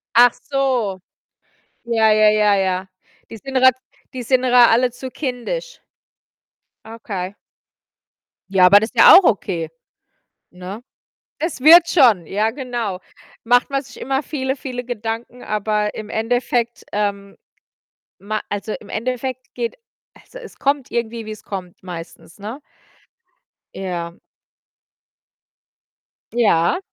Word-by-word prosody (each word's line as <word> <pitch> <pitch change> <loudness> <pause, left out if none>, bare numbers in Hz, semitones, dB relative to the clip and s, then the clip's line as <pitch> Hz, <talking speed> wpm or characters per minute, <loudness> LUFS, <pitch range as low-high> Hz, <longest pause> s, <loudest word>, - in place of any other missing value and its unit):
Ach 245 +1 +7 0.2
so. 255 -8 0 0.9
Ja, 225 -2 +2
ja, 215 0 +5
ja, 210 -1 +3
ja. 190 -1 -1 0.4
Die - - -8
sind 270 +5 -9
grad 260 -1 +5 0.4
die 255 -2 -5
sind 255 +2 +1
ihr 250 -1 +1
alle 245 0 +5
zu 255 +1 -8
kindisch. 310 - -5 1.1
Okay. 205 -4 -6 1.1
Ja, 190 -1 +5
aber 200 +3 +8
das 220 +2 -3
ist 245 - -21
ja - - +9
auch 385 - +5
okay, 175 - 0 0.8
ne? 185 +5 -9 0.6
Es 320 -4 -3
wird 330 +4 +8
schon, 235 - +4
ja 210 +5 0
genau. 240 -6 -4 0.5
Macht 245 +1 +3
man 275 0 -1
sich - - -14
immer 270 +2 -1
viele, 265 -3 -3
viele 250 -2 -6
Gedanken, 230 +1 -5
aber 210 0 -1
im 215 - -7
Endeffekt, 235 +1 -1
ähm, 200 -1 -3 0.8
ma 215 +2 -4
also 205 +1 -4
im 205 - -15
Endeffekt 255 +2 -4
geht 235 -1 -4 0.4
also - - -14
es 470 - -12
kommt 280 -1 0
irgendwie, 230 -1 -3
wie's 215 -1 -9
kommt, 185 -3 -7
meistens, 175 0 -10
ne? 220 +8 -7 1.1
Ja. 175 -3 -5 2.2
Ja. 205 - +2
230 Hz, 125 wpm, -20 LUFS, 205-255 Hz, 2.2 s, ja